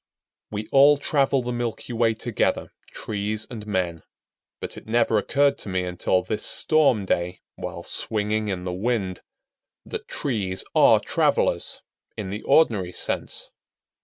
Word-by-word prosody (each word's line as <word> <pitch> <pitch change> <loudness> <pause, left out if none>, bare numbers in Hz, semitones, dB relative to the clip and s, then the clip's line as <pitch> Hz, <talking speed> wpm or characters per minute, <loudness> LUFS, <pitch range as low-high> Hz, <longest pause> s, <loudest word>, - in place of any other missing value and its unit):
We 105 0 -5
all 140 +2 +7
travel 140 -2 +1
the 125 - -3
milky 120 0 -4
way 115 -1 +2
together, 115 -1 -1 0.2
trees 105 +1 -3
and 110 -3 -7
men; 90 -5 -1 0.6
but - - -6
it - - -11
never 115 -1 +3
occurred 140 +6 +2
to - - -4
me 95 -1 0
until 90 +1 0
this 105 +4 -2
storm 140 -10 +3
day, 90 -1 -1
while - - -6
swinging 105 0 -1
in 95 -3 -3
the 90 -1 -3
wind, 100 -2 -1 0.6
that - - -6
trees 100 -8 -2
are - - +6
travelers, - - +1 0.3
in 100 -3 -4
the 105 +3 -4
ordinary 110 - +3
sense. - - -3
110 Hz, 140 wpm, -24 LUFS, 95-120 Hz, 0.6 s, all